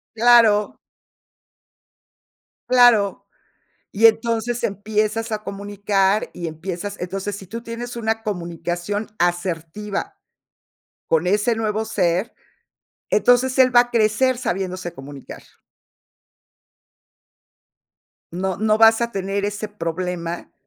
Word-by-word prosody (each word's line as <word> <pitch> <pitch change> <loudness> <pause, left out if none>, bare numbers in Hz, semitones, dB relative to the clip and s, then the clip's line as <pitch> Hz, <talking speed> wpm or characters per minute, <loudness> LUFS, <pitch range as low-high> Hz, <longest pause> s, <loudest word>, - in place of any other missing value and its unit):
Claro. 225 -3 +4 1.9
Claro. 240 -5 +4 0.7
Y 225 +3 +6
entonces 230 +1 +1
empiezas 215 +2 -1
a 215 - -3
comunicar, 200 0 0
y 170 -2 -4
empiezas, 180 +5 -6
entonces, 195 +2 -4
si 190 - -11
tú 230 +5 -7
tienes 240 +1 -7
una 225 -1 -1
comunicación 175 +1 -4
asertiva 175 - -2 0.9
con 165 +2 +2
ese 210 +5 +1
nuevo 220 0 -1
ser, 185 -1 0 0.8
entonces 250 +1 +3
él 255 -1 +5
va 240 - +9
a 240 0 -1
crecer 235 +3 +2
sabiéndose 185 -5 -3
comunicar. 140 -2 -11 2.9
No 185 +1 -3
no 215 +1 +2
vas 225 +1 +6
a 235 0 -1
tener 195 0 -2
ese 205 +1 -4
problema, 175 -3 -4
205 Hz, 100 wpm, -21 LUFS, 185-225 Hz, 2.9 s, va